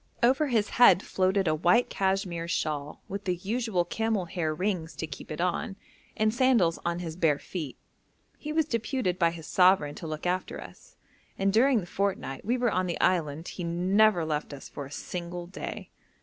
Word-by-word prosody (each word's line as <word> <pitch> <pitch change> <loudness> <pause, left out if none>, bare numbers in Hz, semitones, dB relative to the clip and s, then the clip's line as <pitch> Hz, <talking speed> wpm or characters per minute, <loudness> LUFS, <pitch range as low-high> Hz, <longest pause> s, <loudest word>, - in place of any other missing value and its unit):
Over 265 +5 +4
his 225 -5 +1
head 220 -6 +8
floated 190 0 +1
a 155 - +3
white 175 +10 +3
cashmere 190 -3 -1
shawl, 150 -3 -3
with 200 +1 -6
the 180 -2 +1
usual 200 -1 -1
camel 220 0 -1
hair 165 -2 -2
rings 165 -2 -2
to 160 - -3
keep 150 -3 -9
it 155 - -5
on, 180 +3 -1 0.4
and 215 0 +2
sandals 240 -10 +3
on 170 0 -1
his 165 -3 -5
bare 160 -4 +2
feet. 155 -4 -6 0.6
He 300 - -5
was 320 0 +2
deputed 230 - -1
by 170 -2 +4
his 165 -1 -8
sovereign 180 -6 +4
to 165 - -7
look 155 +1 -5
after 180 +1 -1
us, - - -13 0.4
and 195 0 +1
during 245 +1 +4
the - - -7
fortnight 190 -7 -2
we 240 +5 0
were 245 -2 +1
on 185 0 0
the 170 - -3
island 160 -3 +1
he 180 - -6
never 180 +2 +3
left 150 -1 -2
us 135 - -10
for 140 -2 -7
a - - -16
single 175 +2 -5
day. 180 - -7
180 Hz, 190 wpm, -28 LUFS, 165-210 Hz, 0.6 s, head